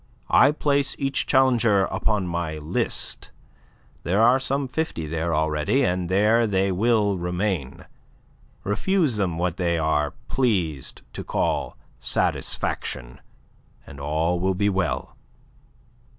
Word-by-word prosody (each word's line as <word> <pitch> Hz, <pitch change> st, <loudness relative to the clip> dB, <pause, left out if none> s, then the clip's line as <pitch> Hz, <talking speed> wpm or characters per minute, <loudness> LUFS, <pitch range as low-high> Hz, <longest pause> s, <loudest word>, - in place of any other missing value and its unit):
I -, -, +6 dB
place 140 Hz, -2 st, 0 dB
each 135 Hz, 0 st, -1 dB
challenger 120 Hz, -7 st, +3 dB
upon 105 Hz, +1 st, -1 dB
my 85 Hz, -3 st, -3 dB
list. 75 Hz, +1 st, -3 dB, 0.7 s
There 95 Hz, +5 st, 0 dB
are 125 Hz, +3 st, +5 dB
some 135 Hz, +1 st, -1 dB
fifty 145 Hz, -, -3 dB
there 80 Hz, +1 st, -2 dB
already, 80 Hz, -, +1 dB
and 90 Hz, -3 st, 0 dB
there 110 Hz, +5 st, +3 dB
they 95 Hz, -1 st, +1 dB
will 105 Hz, -1 st, +2 dB
remain. 90 Hz, -5 st, -3 dB, 0.8 s
Refuse 150 Hz, -, +1 dB
them 90 Hz, -5 st, -1 dB
what 90 Hz, 0 st, -1 dB
they 85 Hz, -2 st, 0 dB
are 75 Hz, -2 st, 0 dB
pleased 95 Hz, -, -1 dB
to -, -, -6 dB
call -, -, -1 dB, 0.2 s
satisfaction, 60 Hz, +3 st, -2 dB, 0.6 s
and 70 Hz, -, -11 dB
all 80 Hz, +5 st, 0 dB
will 95 Hz, +1 st, 0 dB
be 100 Hz, +2 st, +1 dB
well." 85 Hz, -10 st, -2 dB
95 Hz, 120 wpm, -24 LUFS, 80-115 Hz, 0.8 s, I